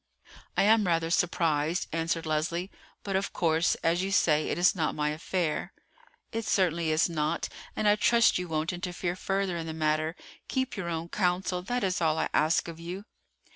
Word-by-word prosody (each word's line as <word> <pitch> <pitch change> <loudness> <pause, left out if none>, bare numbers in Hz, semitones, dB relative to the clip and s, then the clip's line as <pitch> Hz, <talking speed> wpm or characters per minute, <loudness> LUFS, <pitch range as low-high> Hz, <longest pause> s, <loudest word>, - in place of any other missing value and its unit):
"I - - +5
am 215 -1 +4
rather 165 -1 +1
surprised," 165 -2 +1
answered 165 0 -1
Leslie; 165 +4 -1 0.3
"but 195 -1 -2
of 195 +1 -1
course, 165 0 +2
as 170 +2 +2
you 195 +1 -2
say, 155 -5 +3
it - - -1
is 180 +2 +4
not 160 -4 -1
my 150 0 0
affair." 165 +2 -2 0.6
"It 225 0 -2
certainly 170 -5 +1
is 155 +1 +3
not, 160 -1 -1 0.3
and 215 - 0
I 205 0 +5
trust 235 -2 +4
you 180 - -4
won't 160 +1 -1
interfere 175 -1 -3
further 195 -1 -1
in 165 -1 -4
the 160 - -4
matter. 155 +1 0 0.3
Keep 260 0 -1
your 185 -5 -4
own 165 0 -3
counsel, 180 -1 0
that 245 +6 -2
is 185 -2 0
all 160 -1 +2
I 160 - 0
ask 155 +3 +2
of 165 -1 -8
you." 180 +4 -6
170 Hz, 185 wpm, -28 LUFS, 160-190 Hz, 0.6 s, I